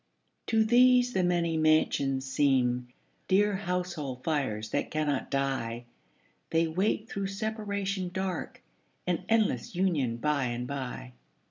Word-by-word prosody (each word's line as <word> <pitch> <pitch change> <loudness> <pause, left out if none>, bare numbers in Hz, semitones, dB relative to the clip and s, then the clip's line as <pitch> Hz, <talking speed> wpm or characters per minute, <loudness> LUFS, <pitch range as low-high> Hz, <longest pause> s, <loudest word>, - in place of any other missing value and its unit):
To 220 -1 +3
these 250 +1 +5
the 185 - +2
many 170 -2 +1
mansions 140 -4 +2
seem 130 -3 +2 0.4
Dear 205 +2 +3
household 175 -9 -3
fires 120 -9 -1
that - - -1
cannot 150 -3 -1
die; 130 -4 -2 0.6
They 165 +1 +2
wait 195 +6 0
through 195 -2 -3
separation 200 -2 -3
dark 185 -1 -4 0.4
An 180 0 -1
endless 215 - +1
union 155 -11 +1
by 145 +1 0
and 120 0 -3
by. 125 - -5
160 Hz, 120 wpm, -29 LUFS, 135-195 Hz, 0.6 s, these